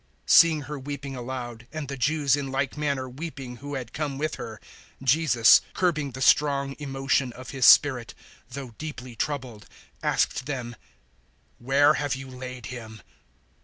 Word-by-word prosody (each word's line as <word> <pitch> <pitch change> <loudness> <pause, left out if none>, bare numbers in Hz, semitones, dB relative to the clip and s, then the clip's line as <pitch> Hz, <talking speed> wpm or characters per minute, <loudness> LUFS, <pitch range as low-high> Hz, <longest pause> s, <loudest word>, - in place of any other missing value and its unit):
011:033 - - -14
Seeing 160 -2 +7
her 145 +1 -6
weeping 140 0 -6
aloud, 120 -2 -6
and 155 -2 -5
the 140 - -5
Jews 145 +1 +2
in 140 -2 -4
like 135 0 -1
manner 140 -3 -1
weeping 135 -2 -7
who 145 +3 -6
had 125 -4 -6
come 145 -3 -3
with 155 +2 -2
her, 110 -1 -7 0.4
Jesus, 130 -4 +5
curbing 155 -7 0
the 130 - -7
strong 140 -1 +3
emotion 135 -2 0
of 130 +1 -9
His 130 -3 +3
spirit, 130 -5 +5 0.3
011:034 - - -16
though 135 -4 -7
deeply 130 -6 -7
troubled, 125 -5 -4 0.3
asked 125 - 0
them, 125 -4 -4 0.8
"Where 140 +4 +4
have 145 -3 -1
you 135 0 -8
laid 125 -1 -8
him?" 110 -3 -9
135 Hz, 160 wpm, -26 LUFS, 125-145 Hz, 0.8 s, Seeing